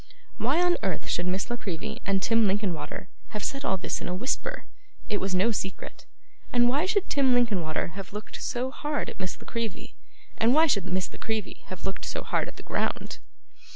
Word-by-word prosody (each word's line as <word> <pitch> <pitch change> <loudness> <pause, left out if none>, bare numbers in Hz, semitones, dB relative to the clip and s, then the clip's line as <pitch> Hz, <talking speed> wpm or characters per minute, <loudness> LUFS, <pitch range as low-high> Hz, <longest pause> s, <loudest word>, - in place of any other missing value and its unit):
Why 260 +9 +3
on 355 0 +4
earth 190 -4 -1
should 175 - 0
Miss 190 +5 0
La 240 - 0
Creevy 215 +3 -4
and 195 -1 +2
Tim 230 -2 +5
Linkinwater 190 -3 -1 0.3
have 210 - -4
said 275 0 -2
all 190 - +2
this - - -2
in - - -3
a 180 - -1
whisper? 295 - -1 0.4
It 205 -2 +1
was 190 -1 0
no 200 +6 +4
secret. 190 -3 -4 0.4
And 240 -1 +5
why 285 +8 +3
should 395 +1 +2
Tim 265 -3 +4
Linkinwater 195 -11 +2
have 190 +2 -7
looked 210 +1 -6
so 255 +2 -1
hard 295 +1 -2
at - - -12
Miss 185 0 -3
La - - -12
Creevy, 230 -4 -3 0.5
and 235 +4 +5
why 320 +1 +8
should 200 - +2
Miss 185 0 -1
La - - -10
Creevy 220 -2 -2
have 185 - -6
looked 195 - -3
so - - -2
hard - - +1
at - - -8
the - - -9
ground? - - -1
215 Hz, 205 wpm, -28 LUFS, 190-250 Hz, 0.5 s, why